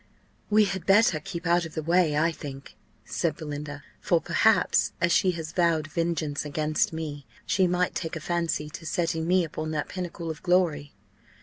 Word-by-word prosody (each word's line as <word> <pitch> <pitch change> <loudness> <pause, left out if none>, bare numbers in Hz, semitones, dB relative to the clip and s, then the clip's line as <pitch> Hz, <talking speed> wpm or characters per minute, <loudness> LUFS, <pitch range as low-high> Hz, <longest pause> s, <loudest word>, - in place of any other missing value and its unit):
"We 210 0 +5
had 190 -2 -4
better 195 -4 +5
keep 170 +3 -7
out 175 0 +3
of 160 -1 -8
the 155 - -2
way, 165 -2 +3
I 165 +2 +3
think," 140 -3 -9 0.3
said 160 -3 -1
Belinda: 145 -1 -6 0.2
"for 170 - +2
perhaps, 210 +4 +2
as 170 0 +2
she 190 +1 +4
has 160 -2 -6
vowed 170 -3 +2
vengeance 155 -2 -2
against 155 +1 0
me, 150 -3 -6 0.2
she 190 -2 +2
might 180 +1 +1
take 165 -2 -4
a - - -3
fancy 170 -2 -1
to 165 - -9
setting 165 -3 -1
me 180 0 +4
upon 155 0 -4
that 150 -1 -2
pinnacle 175 -2 -5
of 155 - -9
glory." 170 -6 +1
165 Hz, 180 wpm, -27 LUFS, 155-175 Hz, 0.3 s, We